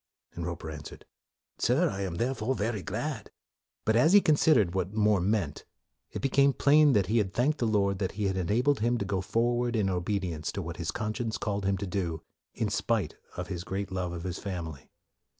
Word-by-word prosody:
1 85 - -5
Roper 80 -2 -5
answered, 75 -1 -9 0.3
" - - -63
Sir, 140 +9 +3
I 95 - -4
am 95 -3 -3
thereof 125 +4 -1
very 105 -1 -1
glad." - - -4 0.6
But 110 - +3
as 155 +10 +5
he 205 - +10
considered 145 - +4
what 95 +2 -2
More 105 -2 +3
meant, 95 -6 0
46 - - -18
MORE - - -48
it - - -5
became 140 0 +4
plain 145 +1 +5
that 100 -4 +3
he 110 +5 +2
had 95 -3 -2
thanked 145 +5 +1
the 120 - +1
Lord 100 -3 +1
that 95 -3 -2
He 105 - -3
had 95 -1 0
enabled 115 +10 +1
him 120 +3 +1
to 100 - -2
go 95 -1 -1
forward 120 +4 0
in 100 -3 +1
obedience 90 -3 -2
to 100 - -3
what 85 +1 -6
his 85 - -3
con 110 0 -2
science 115 -2 -3
called 100 -2 -2
him 100 0 +1
to 100 - -4
do, 90 -4 -3 0.3
in - - -1
spite - - -1 0.2
of 90 +2 -4
his 90 -3 -4
great 95 +1 -4
love 90 -2 -2
of 85 -1 -6
his 90 -1 -4
family. 85 -8 -6
100 Hz, 220 wpm, -29 LUFS, 90-120 Hz, 0.6 s, he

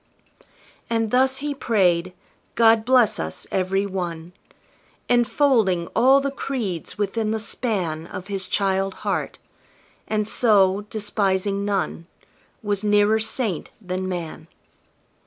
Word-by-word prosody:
And 225 -2 0
thus 265 +1 +3
he 295 - -1
prayed, 185 -9 +1 0.4
"God 225 -1 +4
bless 250 -3 +4
us 80 0 -5
every 195 +1 0
one!" 175 -3 -5 0.7
Enfolding 240 -7 +2
all 265 +4 +6
the 275 0 -2
creeds 230 - -4
within 210 +2 -1
the 220 - 0
span 185 -8 -2
Of 180 - -7
his 190 -1 -3
child 195 0 0
heart; - - -2 0.7
and 215 -1 -1
so, 205 -3 +3
despising 200 -2 -1
none, 195 -4 -2 0.6
Was 205 -1 -1
nearer 210 +1 +3
saint 220 - -2
than 185 -2 -4
man. 170 -3 -6
205 Hz, 115 wpm, -23 LUFS, 185-225 Hz, 0.7 s, all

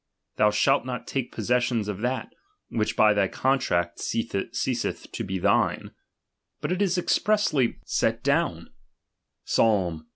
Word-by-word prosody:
'^' - - -43
Thou 105 - +5
shalt 135 +6 +2
not 125 -1 -5
take 130 -3 -3
possession 120 -1 0
of 105 -2 -4
that, 125 +2 -2 0.4
which 110 -2 -1
by 105 -1 +5
thy 100 -2 +2
contract 90 -10 0
ceaseth 115 +2 -2
to - - -4
be 95 0 -3
thine: 90 - +1 0.7
but - - -3
it 185 +2 -1
is 190 -2 +2
expressly 185 - +2
ily - - -3
j - - +1
thuktU - - -1 0.9
I 90 -8 +2
115 Hz, 140 wpm, -26 LUFS, 105-130 Hz, 0.9 s, Thou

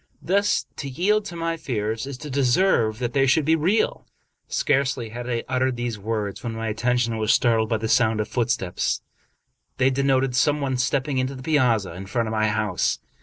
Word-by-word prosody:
Thus 200 +3 +1
to 140 - -5
yield 200 +10 +1
to 180 -4 -7
my 165 0 -2
fears 115 -5 -3
is 140 -2 -6
to 150 +1 -8
deserve 130 - +2
that 120 0 -3
they 135 -1 +3
should 145 +3 +3
be 160 +2 +4
real." 185 +8 0 0.4
Scarcely 130 -4 0
had 120 +2 -6
I 120 -1 -1
uttered 130 0 0
these 120 -3 -3
words, 105 -1 -3
when 115 -2 -3
my 115 0 -3
attention 120 0 0
was 110 0 +2
startled 115 -2 +3
by 115 - +1
the 110 +1 -3
sound 110 -1 +3
of 105 - -1
footsteps. 110 -7 -1 0.7
They 130 +1 +3
denoted 135 -1 +1
some 150 +2 +2
one 135 -2 -1
stepping 130 +2 0
into 130 +2 -2
the 130 - -9
piazza 120 - +2
in 95 +3 -8
front 115 +3 -1
of - - -3
my 110 -1 +1
house. 105 -5 0
125 Hz, 195 wpm, -24 LUFS, 110-140 Hz, 0.7 s, be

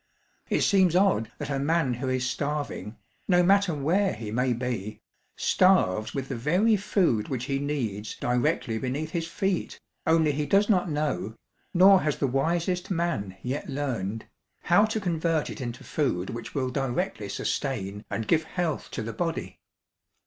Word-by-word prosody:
It - - +1
seems 190 -4 +4
odd 180 - +3
that 145 -1 -5
a 135 - 0
man 155 -2 +1
who 130 +2 -3
is 130 -1 0
starving, 140 -7 -3 0.3
no 180 -2 +4
matter 195 -2 +3
where 180 +8 +1
he 110 -2 -6
may 125 +3 +1
be, 120 -4 -3 0.4
starves 110 - +3
with 135 -1 -3
the - - -4
very 180 - +3
food 185 - +1
which 130 -3 -2
he 135 -1 -1
needs 115 -8 -3
directly 125 -1 0
beneath 140 +6 -3
his 165 -2 -2
feet, 190 0 -2 0.3
only 160 -2 +4
he 145 +1 -2
does 200 +1 +4
not 185 -4 +3
know, 135 - -2 0.4
nor 190 +1 +7
has 150 -1 0
the - - 0
wisest 170 +7 0
man 165 - -2
yet 130 +5 -3
learned, 115 -7 -3 0.4
how 205 - +5
to 220 0 -2
convert 165 -4 0
it - - -8
into 120 -1 -5
food 95 - -1
which 115 0 -7
will 130 -2 0
directly 135 - -2
sustain 105 -3 -3
and 110 - -3
give 160 -1 +2
health 170 -2 -2
to 115 - -4
the 115 +1 -5
body. 165 -2 -3
145 Hz, 165 wpm, -27 LUFS, 120-175 Hz, 0.4 s, nor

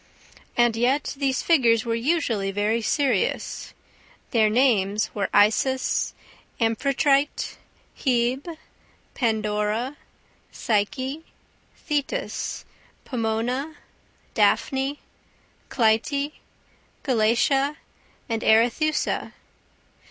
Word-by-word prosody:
And 240 -1 +4
yet 250 +5 +1
these 270 -2 -1
figures 240 -8 +3
were 230 - -1
usually 230 -6 0
very 210 +4 0
serious. 250 -3 -1 0.6
Their 220 -3 +4
names 215 -4 +2
were 200 -2 -2
Isis, 240 +6 +2 0.4
Amphitrite, 275 +5 +1 0.4
Hebe, 260 +5 0 0.6
Pandora, 220 +2 -1 0.5
Psyche, 260 +8 -1 0.5
Thetis, 300 - -3 0.4
Pomona, 245 +5 -2 0.6
Daphne, 270 +1 +1 0.7
Clytie, 280 +5 +1 0.7
Galatea 270 +4 +2 0.5
and 225 -1 -2
Arethusa. 240 +8 +2
245 Hz, 70 wpm, -24 LUFS, 220-280 Hz, 0.7 s, And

